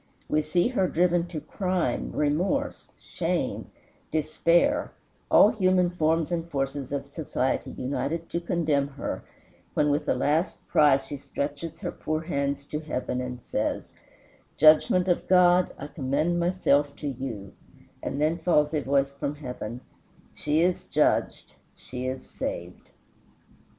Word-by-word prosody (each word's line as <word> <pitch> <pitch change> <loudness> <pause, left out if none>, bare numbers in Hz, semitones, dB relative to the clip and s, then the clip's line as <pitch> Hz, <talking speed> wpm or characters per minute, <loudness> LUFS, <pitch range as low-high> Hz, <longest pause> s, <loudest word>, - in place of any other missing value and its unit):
We 155 - +2
see 175 +7 +1
her 195 -8 +1
driven 175 0 +2
to 170 -3 -5
crime, 180 -7 -2
remorse, 180 - -1
shame, - - -2 0.4
despair, 170 - +2 0.4
all 205 - +7
human 185 -5 +2
forms 165 -1 +1
and 170 -1 -2
forces 135 -2 -3
of 140 -1 -2
society 140 -2 -2
united 140 +6 -3
to 170 - -1
condemn 155 -5 +1
her, 140 0 -5 0.5
when 150 -1 +3
with 145 +1 -1
a - - +3
last 155 +5 +1
cry 145 -3 +5
she 135 +1 -7
stretches 145 +4 -5
her - - -3
poor 155 0 -3
hands 140 -4 -2
to 150 - -4
heaven 130 -4 -3
and 125 -1 -6
says, - - -2 0.6
"Judgment 155 +4 +5
of 175 - +1
God, 180 -1 +5
I 140 - -7
commend 150 +4 -1
myself 150 -5 +2
to 150 - -5
you;" 120 -7 -5 0.5
and 140 - -3
then 155 +3 +1
falls 155 -3 +2
a 150 - +1
voice 140 +1 +1
from 140 +1 -4
heaven, 125 -4 -6 0.5
"She 150 +2 0
is 180 +1 +1
judged; - - +1 0.2
she 125 0 -6
is 130 0 -5
saved." - - -6
150 Hz, 140 wpm, -27 LUFS, 140-175 Hz, 0.6 s, all